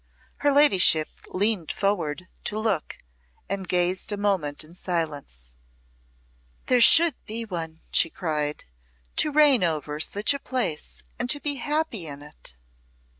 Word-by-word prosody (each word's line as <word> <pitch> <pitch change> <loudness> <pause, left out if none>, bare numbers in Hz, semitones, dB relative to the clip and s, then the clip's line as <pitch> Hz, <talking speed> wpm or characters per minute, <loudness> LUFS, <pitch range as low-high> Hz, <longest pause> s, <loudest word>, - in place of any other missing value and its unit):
Her 290 - +1
ladyship 190 - +5 0.2
leaned 200 -3 -1
forward 180 -4 -2 0.2
to 210 - -1
look, 215 -7 -2 0.5
and 195 -1 -4
gazed 180 +2 0
a 205 - -3
moment 190 -9 0
in 155 +2 -15
silence. 150 - -4 1.1
"There 250 -1 +2
should 330 +6 +7
be 225 +2 -4
one," 165 -5 -6
she 165 - +3
cried, 150 -4 -3 0.5
"to 305 - +3
reign 290 -6 +5
over 150 -3 -2
such 205 - +3
a 280 - -5
place, 250 - -3 0.2
and 245 - -3
to 290 - +5
be 285 -1 0
happy 290 - -2
in 145 0 -6
it." 150 - -4
185 Hz, 135 wpm, -24 LUFS, 155-240 Hz, 1.1 s, should